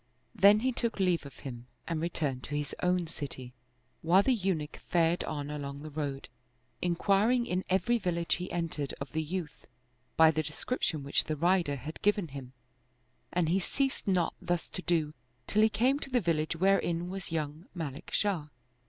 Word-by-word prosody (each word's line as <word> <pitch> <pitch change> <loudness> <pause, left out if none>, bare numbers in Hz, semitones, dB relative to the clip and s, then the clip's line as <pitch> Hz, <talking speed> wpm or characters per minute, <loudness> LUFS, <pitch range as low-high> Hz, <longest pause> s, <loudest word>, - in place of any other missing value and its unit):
Then 205 0 +6
he 260 +2 +2
took 235 -3 -2
leave 180 -6 +2
of 140 - -14
him 120 -3 -7 0.2
and 165 -2 -1
returned 150 -6 -1
to 145 - -4
his 145 -2 -3
own 180 -1 +2
city, 135 -5 -6 0.5
while 180 +5 +5
the 265 - +3
Eunuch 180 -9 -1
fared 170 0 +1
on 145 -1 -4
along 140 -1 -5
the 155 - -7
road, 140 -2 -3 0.5
inquiring 200 +7 +3
in 180 -2 -1
every 195 +6 +2
village 170 -4 0
he 180 +1 -5
entered 165 -5 -2
of 140 - -6
the 160 - 0
youth, 160 -1 -5 0.5
by 160 -1 +8
the 155 0 0
description 155 - -1
which 140 - +1
the 155 - -1
rider 170 -2 +2
had 150 +4 -7
given 205 -4 +2
him, 135 -2 -8 0.8
and 175 -3 +1
he 185 +3 +3
ceased 270 +7 -1
not 180 -4 +2
thus 175 -1 -1
to 185 - -5
do 160 -4 +1 0.3
till 215 - +2
he 220 - +6
came 260 +6 +2
to 275 - -6
the 250 -1 +3
village 165 -5 0
wherein 175 -1 +2
was 190 -1 -6
young 155 +1 -3
Malik 150 -5 -5
Shah. 185 -8 0
170 Hz, 180 wpm, -31 LUFS, 150-190 Hz, 0.8 s, by